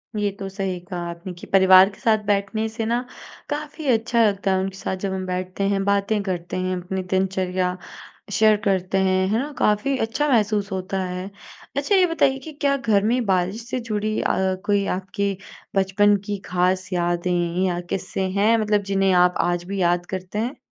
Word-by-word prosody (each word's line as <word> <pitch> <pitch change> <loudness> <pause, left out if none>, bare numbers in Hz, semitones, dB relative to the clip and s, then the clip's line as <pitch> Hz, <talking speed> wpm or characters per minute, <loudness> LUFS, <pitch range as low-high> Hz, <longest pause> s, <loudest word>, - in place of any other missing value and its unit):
ये 210 -1 +1
तो 195 - -4
सही 195 -2 -3
कहा 180 0 -7
आपने 170 +2 -7
कि - - -10
परिवार 190 0 +7
के 200 - -16
साथ 220 -1 +3
बैठने 205 +2 0
से 220 0 -4
ना 235 +2 0 0.5
काफ़ी 300 +1 -5
अच्छा 235 -1 +3
लगता 200 -1 0
है, 190 - +2
उनके 190 0 -3
साथ 190 - -3
जब 190 0 -3
हम 190 0 -3
बैठते 185 +1 -3
हैं, 195 -1 0
बातें 200 +1 +1
करते 180 -3 -3
हैं, 185 0 -1
अपनी 185 +1 -4
दिनचर्या 185 -1 -1 0.5
शेयर 215 +1 +5
करते 190 -1 +1
हैं। 190 0 +2
है 220 +3 +1
ना? 285 +4 -3
काफ़ी 245 +7 +1
अच्छा 250 +6 -1
महसूस 210 -4 +1
होता 190 0 -2
है। 180 +1 -5 0.5
अच्छा, 285 +9 +2
ये 375 -1 +5
बताइए 330 -6 +2
कि 310 +4 -10
क्या 280 -1 +3
घर 220 -7 +2
में 240 +2 +1
बारिश 190 +4 0
से 255 - -2
जुड़ी 215 -2 -2
अ, 190 0 +1
कोई 205 -1 +2
आपके 195 +1 -2 0.4
बचपन 195 +2 +3
की 205 -1 -2
ख़ास 185 +1 0
यादें 175 0 0
या 175 -2 0
क़िस्से 190 0 -2
हैं 220 +3 +4
मतलब 210 -1 +1
जिन्हें 195 0 +3
आप 180 0 +4
आज 175 0 0
भी 195 +2 -4
याद 175 0 +2
करते 185 +2 -5
हैं? 245 +5 -3
195 Hz, 190 wpm, -23 LUFS, 185-215 Hz, 0.5 s, परिवार